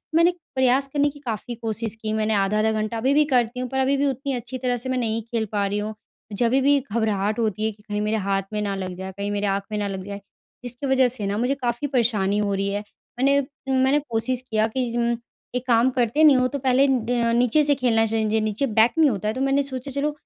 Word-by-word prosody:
मैंने 335 +2 +5 0.2
प्रयास 260 +1 +3
करने 290 0 +2
की 290 0 -13
काफ़ी 240 -2 -5
कोशिश 225 -1 -3
की 215 -1 -2
मैंने 220 0 0
आधा-आधा 210 +2 +2
घंटा 215 +1 -2
अभी 260 +5 +1
भी 300 +1 +4
करती 245 0 +2
हूँ 250 0 -3
पर 265 +1 -2
अभी 270 +1 +2
भी 285 - +1
उतनी 275 +1 -2
अच्छी 245 +1 -5
तरह 250 -1 -1
से 250 +2 -5
मैं 260 - 0
नहीं 225 -2 -1
खेल 230 0 -3
पा 205 -2 +1
रही 205 +1 -1
हूँ। 215 +1 -4 0.4
जभी 240 +5 +2
भी 285 +1 +4
घबराहट 215 -3 -1
होती 215 -1 0
है 220 - 0
कि 210 0 -19
कहीं 210 0 -3
मेरे 215 +1 0
हाथ 195 -1 0
में 210 - -1
ना 200 -1 -2
लग 185 -1 -4
जाए, 190 +1 -6
कहीं 200 +1 -3
मेरे 205 0 -1
आँख 195 0 0
में 210 - -2
ना 205 -1 -1
लग 190 -1 -5
जाए 200 0 -7 0.4
जिसकी 245 +3 -4
वजह 265 -1 +4
से 240 -4 -3
ना 200 +1 -1
मुझे 250 +4 +1
काफ़ी 245 +1 -2
परेशानी 215 -6 +1
हो 205 -1 0
रही 195 0 -1
है। 205 - -2 0.4
मैंने 280 +2 +4 0.4
मैंने 275 +3 +3
कोशिश 240 +2 0
किया 220 0 +2
कि 255 +2 -2
ज़म 235 0 0 0.4
एक 250 - -2
काम 235 +1 +4
करते 250 +5 +1
नहीं 295 -3 +8
हो 255 - +3
तो 280 +2 -4
पहले 265 +1 +3
न 235 -2 +1
नीचे 250 +5 +3
से 290 0 +3
खेलना 235 -4 +2
चाहिए 220 0 0
जो 220 - +2
नीचे 215 +5 -1
बैट 220 +1 +4
नहीं 315 -2 +5
होता 210 -3 -2
है 215 - 0
तो 260 - -4
मैंने 275 +1 +2
सोचा 265 0 -5
चलो 285 +2 -1
235 Hz, 250 wpm, -23 LUFS, 215-260 Hz, 0.4 s, नहीं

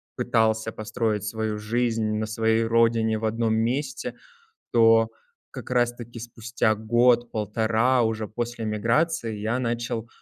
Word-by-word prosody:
пытался 110 0 +1
построить 110 -1 -2
свою 110 0 -3
жизнь 115 0 0
на 110 - -1
своей 110 +1 +1
родине, 115 -1 +2
в 110 - -8
одном 110 0 0
месте, 130 +5 -2 0.6
то 115 -1 +5 0.4
как - - -9
раз 120 -1 +2
таки 120 0 -10
спустя 115 -1 -1
год-полтора 115 +1 +2
уже 110 -1 -1
после 120 +1 -4
эмиграции 115 +4 0
я 110 +4 -1
начал 120 -2 -3
115 Hz, 125 wpm, -25 LUFS, 110-120 Hz, 0.6 s, то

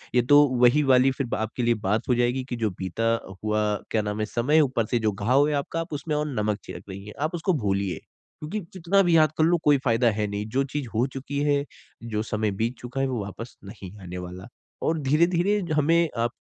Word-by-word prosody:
ये 125 - +6
तो 145 0 +9 0.2
वही 125 +5 +5
वाली 130 -1 +4
फिर 135 -1 -3
आपके 110 +3 -3
लिए 120 0 +3
बात 105 +3 0
हो 125 - +4
जाएगी 120 +2 +1
की 125 - -2
जो 110 -2 0
बीता 115 +5 0 0.3
हुआ 105 0 +1 0.3
क्या 110 - +2
नाम 105 0 -3
है 110 - 0
समय 125 +8 +2
ऊपर 130 -6 +1
से 120 - +2
जो 110 -1 +1
घाव 125 +9 +2
है - - -1
आपका 165 +4 -2
उसमें 150 +1 -3
और 150 0 -1
नमक 105 -1 -1
छिड़क - - -9
रही 95 +1 -8
हैं। 105 - -9
आप 155 +3 -1
उसको 175 +2 0
भूलिए, 100 - -1 0.4
क्योंकि 155 +8 -4
जितना 190 +2 +2
भी 175 -2 +3
याद 155 -1 +4
कर 155 - +3
लो 175 +1 +3
कोई 145 -1 +5
फ़ायदा 120 0 +3
है 105 0 -1
नहीं। 100 +1 -4
जो 135 +5 +1
चीज़ 145 -3 -2
हो 115 +3 +3
चुकी 140 +1 -4
है 145 -1 +2 0.5
जो 105 - 0
समय 110 -1 -1
बीत 115 +3 0
चूका 125 +2 -4
है 135 - +1
वो 125 -4 -2
वापस 115 +4 -9
नहीं 100 -2 -9
आने 90 0 -7
वाला 90 +2 -8 0.4
और 160 0 +1
धीरे-धीरे 170 +7 +2 0.2
हमें 165 +3 +3
अ, 115 -3 -1
125 Hz, 225 wpm, -25 LUFS, 105-150 Hz, 0.5 s, तो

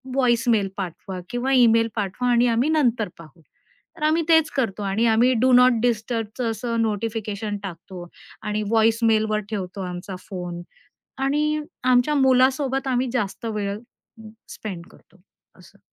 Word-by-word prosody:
Voice 240 -3 +2
mail 205 -4 +2
पाठवा 185 0 -6
किंवा 245 +2 -2
email 230 -2 +5
पाठवा 220 +4 -2
आणि 240 +1 +4
आम्ही 235 +5 +1
नंतर 245 - +1
पाहू. 165 0 -15 0.6
तर 320 - -12
आम्ही 325 +2 +2
तेच 320 -2 +4
करतो. 220 -6 -1
आणि 200 +4 0
आम्ही 230 +3 +4
डू 260 - +4
नॉट 250 -2 +5
डिस्टर्बचं 230 0 -1
असं 230 +1 -2
नोटिफिकेशन 215 -1 -3
टाकतो 175 -1 -8 0.4
आणि 210 0 -2
व्हॉइस 225 0 +3
मेलवर 220 -1 +2
ठेवतो 195 -2 -5
आमचा 180 +1 -6
फोन. 175 -2 -6 0.6
आणि 300 +3 0 0.2
आमच्या 255 +3 +3
मुलासोबत 265 0 +2
आम्ही 255 0 0
जास्त 230 -2 -3
वेळ 205 -2 -3 0.7
स्पेंड 180 -6 -7
करतो 185 +2 -23 0.4
असं. - - -19
225 Hz, 140 wpm, -23 LUFS, 200-250 Hz, 0.7 s, email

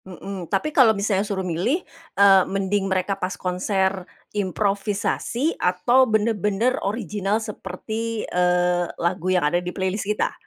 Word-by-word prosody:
Heeh, 190 -1 -8
tapi 295 +11 -1
kalau 225 -7 +5
misalnya 200 -1 +1
suruh 200 -2 -3
milih 185 - -1 0.3
e 200 - +6 0.2
mending 195 0 -1
mereka 190 +1 0
pas 185 +1 -2
konser 190 0 -1 0.2
improvisasi 205 - -1
atau 245 +8 +3
bener-bener 215 +1 +1
original 205 -1 -1
seperti, 220 +1 -5
eee 180 -1 +1
lagu 175 +1 -1
yang 180 -4 +2
ada 175 +4 +1
di 180 - -4
playlist 190 +2 -3
kita? 210 - 0
195 Hz, 130 wpm, -23 LUFS, 185-215 Hz, 0.3 s, e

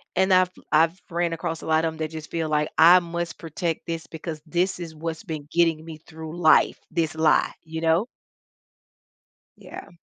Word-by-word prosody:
and 190 0 +3
I've 185 0 +5 0.2
I've 165 +4 +3
ran 170 -1 -1
across 165 0 -4
a - - -9
lot 160 0 +2
of 160 - -1
'em, - - -12
that 155 -1 -3
just 155 -1 -8
feel 165 -1 -1
like, 150 0 +1
"I 175 +3 +8
must 170 0 -5
protect 165 +1 -4
this 165 -1 -4
because 160 -1 -7
this 175 +3 -1
is 165 -2 -7
what's 160 +2 -5
been 155 -7 -6
getting 165 -2 +2
me 160 -1 -9
through 160 +1 -10
life, 160 -3 +4
this 165 -2 0
lie," 160 -1 +3
you 160 0 -6
know? 165 +6 +2 1.5
Yeah. - - -11
165 Hz, 185 wpm, -24 LUFS, 160-170 Hz, 1.5 s, I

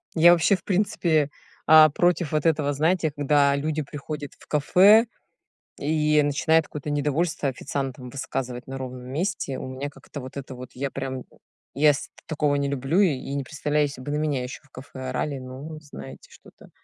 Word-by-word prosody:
Я 170 +1 +7
вообще, 175 +3 +4
в 185 - -10
принципе, 175 -6 +1 0.4
а, 155 0 +9
против 175 +1 +1
вот 155 -2 0
этого, 150 -3 +2
знаете, 160 +2 +1
когда 145 -1 +3
люди 155 +2 -1
приходят 145 0 -7
в - - -18
кафе 195 +9 +6 0.7
и 150 0 +2
начинают 155 +2 +2
какое-то 150 0 -6
недовольство 150 +2 0
официантам 130 -1 -4
высказывать 125 -3 -4
на 135 0 -6
ровном 130 -1 -7
месте, 145 -1 -2
у - - -6
меня 130 +2 -5
как-то 145 - -10
вот 130 +1 -10
это 135 -1 -6
вот, 125 0 -9
я 135 +2 -3
прям 130 -1 -5 0.5
ес 145 0 +3
я - - -19
такого 150 -2 0
не 140 0 0
люблю 140 +6 0
и 140 -7 +1
не 140 - -1
представляю, 150 +1 0
если 140 -2 -8
бы 145 +3 -5
на - - 0
меня 150 -4 0
еще 125 +4 -7
в 140 - -26
кафе 130 +1 -11
орали, 140 +2 -2
ну, 130 +5 -8
знаете 70 - -11
что-то. - - -17
145 Hz, 180 wpm, -25 LUFS, 135-155 Hz, 0.7 s, а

